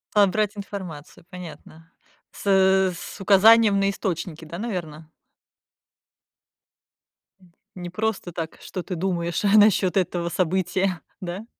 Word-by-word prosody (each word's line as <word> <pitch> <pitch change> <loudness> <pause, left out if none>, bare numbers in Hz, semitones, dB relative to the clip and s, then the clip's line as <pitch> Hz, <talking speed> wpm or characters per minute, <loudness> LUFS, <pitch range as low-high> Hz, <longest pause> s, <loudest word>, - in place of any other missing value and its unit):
А, 205 -1 +7
брать 210 +1 -1
информацию, 185 -7 -8
понятно? 165 -2 -12 0.4
С - - -12
э 190 -1 +4
с 195 - -9
указанием 205 +1 +6
на 195 0 +2
источники, 170 -4 -4
да, 170 +2 -8
наверное? 165 -8 -6 2.3
М. 180 -2 -22 0.2
Не 175 -1 -7
просто 205 -1 -3
так, 165 -1 -6
что 185 - -6
ты 185 - -5
думаешь 170 0 -2
насчёт 205 -3 +4
этого 175 -2 -1
события, 185 +1 -1 0.2
да? 185 +4 -6
185 Hz, 120 wpm, -23 LUFS, 170-200 Hz, 2.3 s, А